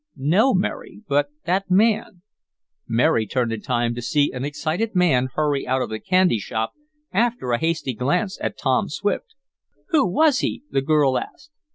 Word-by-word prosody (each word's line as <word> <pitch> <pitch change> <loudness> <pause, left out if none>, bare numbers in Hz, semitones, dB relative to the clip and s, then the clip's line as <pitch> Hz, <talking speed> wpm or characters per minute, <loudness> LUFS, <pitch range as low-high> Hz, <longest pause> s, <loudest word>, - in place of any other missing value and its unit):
"No, 180 - +3
Mary. 195 +3 -3
But 145 0 +2 0.2
that 185 +3 0
man 205 -2 +2 0.3
" - - -66 0.3
Mary 115 -1 +2
turned 120 0 -1
in 110 - -5
time 120 -1 0
to 120 - -5
see 145 +4 +1
an 125 0 -5
excited 160 +9 -2
man 135 -9 +3
hurry 145 -2 0
out 130 0 +1
of - - -6
the 110 - -3
candy 180 - +2
shop 110 +2 -3 0.4
after 230 - 0
a 120 - +1
hasty 160 -5 -1
glance 180 - -1
at - - -3
Tom - - +1
Swift. 460 -3 -3 0.5
"Who 310 - +3
was 285 - +3
he?" - - -2
the 135 - +1
girl 140 -2 +2
asked. 285 +3 -11
155 Hz, 175 wpm, -22 LUFS, 125-195 Hz, 0.5 s, No